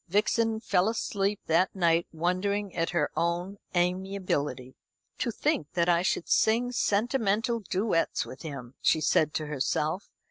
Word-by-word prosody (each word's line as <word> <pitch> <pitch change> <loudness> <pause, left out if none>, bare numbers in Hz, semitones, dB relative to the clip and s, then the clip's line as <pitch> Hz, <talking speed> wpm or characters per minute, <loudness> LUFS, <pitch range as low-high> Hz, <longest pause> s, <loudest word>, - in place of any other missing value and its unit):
Vixen 220 +4 +1
fell 190 -2 +2
asleep 205 -2 -1
that 170 +5 +2
night 170 -2 +2
wondering 185 +4 -1
at 165 0 0
her 175 - 0
own 175 +4 -1 0.2
amiability. 180 -7 -1 0.5
"To - - 0
think 150 - -1
that 170 -1 +1
I 170 0 +4
should 180 - -1
sing 235 +3 +3
sentimental 230 0 +1
duets 195 -3 0
with 130 - -10
him," 140 -6 -7
she 160 - +3
said 155 0 +2
to 155 - -1
herself. 150 +5 -1
180 Hz, 140 wpm, -28 LUFS, 165-205 Hz, 0.5 s, I